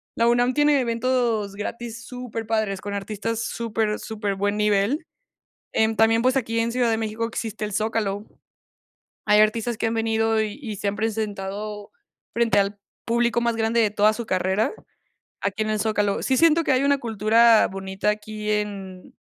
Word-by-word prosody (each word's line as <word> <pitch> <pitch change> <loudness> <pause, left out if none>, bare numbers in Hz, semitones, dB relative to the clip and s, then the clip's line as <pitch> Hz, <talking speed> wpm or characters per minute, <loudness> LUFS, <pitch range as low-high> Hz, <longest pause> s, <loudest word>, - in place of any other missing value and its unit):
La 230 - +2
UNAM 245 +1 +3
tiene 295 0 +4
eventos 230 -4 0
gratis 230 +2 -6
superpadres 225 -5 -3
con 205 0 -5
artistas 215 +3 -3
super 225 -2 -2
superbuen 205 -2 -2
nivel. 210 - +1 0.7
En 220 0 +2
también, 225 +1 +4
pues, 255 +2 +2
aquí 230 -3 0
en 230 +1 0
Ciudad 245 -1 +1
de 225 - +1
México 220 +1 -2
existe 220 -2 -4
el 210 - -4
Zócalo. 215 -1 -1 1.0
Hay 210 0 +5
artistas 225 +1 +1
que 225 - 0
han 225 - -1
venido, 225 -1 +1
y 215 +1 -3
y 215 -7 -5
se 205 - -3
han 200 - -1
presentado 210 -1 -4 0.4
frente 235 -2 +2
al 200 +1 -1 0.3
público 235 0 +1
más 235 -1 +1
grande 225 +1 +1
de 210 -2 +2
toda 210 +1 +3
su 235 +1 -5
carrera 190 +2 0 0.7
aquí 200 +2 -1
en 215 - -1
el 215 - 0
Zócalo. 205 -2 0
Sí 265 - +1
siento 330 +2 +4
que - - +2
hay 260 +1 +3
una 280 0 +3
cultura 225 0 +4
bonita 190 +1 -2
aquí 215 0 -4
en 200 -3 -4
220 Hz, 170 wpm, -24 LUFS, 210-235 Hz, 1.0 s, Hay